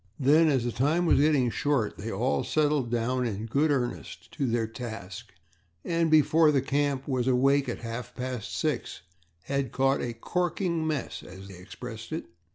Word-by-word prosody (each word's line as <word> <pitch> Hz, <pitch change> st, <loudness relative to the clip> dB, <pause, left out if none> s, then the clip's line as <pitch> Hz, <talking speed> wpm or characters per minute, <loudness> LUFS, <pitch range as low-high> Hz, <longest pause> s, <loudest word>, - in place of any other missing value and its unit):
Then, 150 Hz, +4 st, +5 dB
as 135 Hz, -5 st, +2 dB
the 120 Hz, -, -1 dB
time 150 Hz, +9 st, +1 dB
was 165 Hz, -, +4 dB
getting 140 Hz, -5 st, +3 dB
short, 140 Hz, -6 st, 0 dB
they 110 Hz, +3 st, -4 dB
all 120 Hz, +7 st, 0 dB
settled 150 Hz, -5 st, +1 dB
down 120 Hz, +2 st, 0 dB
in 105 Hz, 0 st, -4 dB
good 140 Hz, +7 st, +1 dB
earnest 125 Hz, -4 st, -3 dB
to 135 Hz, -, -2 dB
their 115 Hz, -1 st, +1 dB
task 110 Hz, -2 st, -8 dB, 0.5 s
and, 165 Hz, -1 st, +1 dB
before 155 Hz, 0 st, +5 dB
the 140 Hz, -, +3 dB
camp 140 Hz, 0 st, -1 dB
was 130 Hz, -3 st, 0 dB
awake 135 Hz, +1 st, +3 dB
at -, -, -5 dB
half 120 Hz, +1 st, -6 dB
past 125 Hz, -4 st, -4 dB
six, -, -, -2 dB, 0.4 s
had 140 Hz, -1 st, -2 dB
caught 135 Hz, +1 st, +2 dB
a 120 Hz, -, -3 dB
"corking 170 Hz, -, -1 dB
mess," 150 Hz, -5 st, -3 dB
as 95 Hz, +2 st, -11 dB
they 95 Hz, -, -10 dB
expressed 110 Hz, +4 st, -9 dB
it. 160 Hz, -, -3 dB
130 Hz, 170 wpm, -28 LUFS, 115-150 Hz, 0.5 s, Then